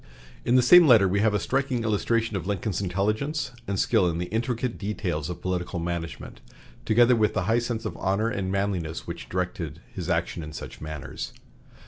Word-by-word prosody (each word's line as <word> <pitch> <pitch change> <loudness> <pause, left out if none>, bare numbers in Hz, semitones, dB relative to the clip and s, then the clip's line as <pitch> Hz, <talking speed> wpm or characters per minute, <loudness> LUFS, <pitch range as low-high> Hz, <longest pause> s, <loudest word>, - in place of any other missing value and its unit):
In 120 - +2
the 125 - +6
same 175 +6 +8
letter 110 -7 +7
we 100 +2 +1
have 105 0 +3
a - - +2
striking 135 -1 0
illustration 110 0 0
of 95 -1 -3
Lincoln's 100 -1 -1
intelligence 105 - -1 0.2
and 100 -1 -1
skill 90 - +3
in 85 - -2
the 90 +1 -4
intricate 120 +1 -1
details 90 -7 -2
of 90 - -7
political 90 0 -2
management, 85 -1 -5 0.4
together 120 +2 +5
with 110 -2 +1
the 95 - +1
high 110 +5 +2
sense 120 -1 -3
of 110 - -3
honor 100 +4 0
and 100 -4 -2
manliness 95 -5 -2
which 85 0 -7
directed 85 -4 -3
his 90 -2 -5
action 85 0 -1
in 75 0 -8
such - - -8
matters. 75 -2 -6
100 Hz, 185 wpm, -26 LUFS, 90-115 Hz, 0.4 s, same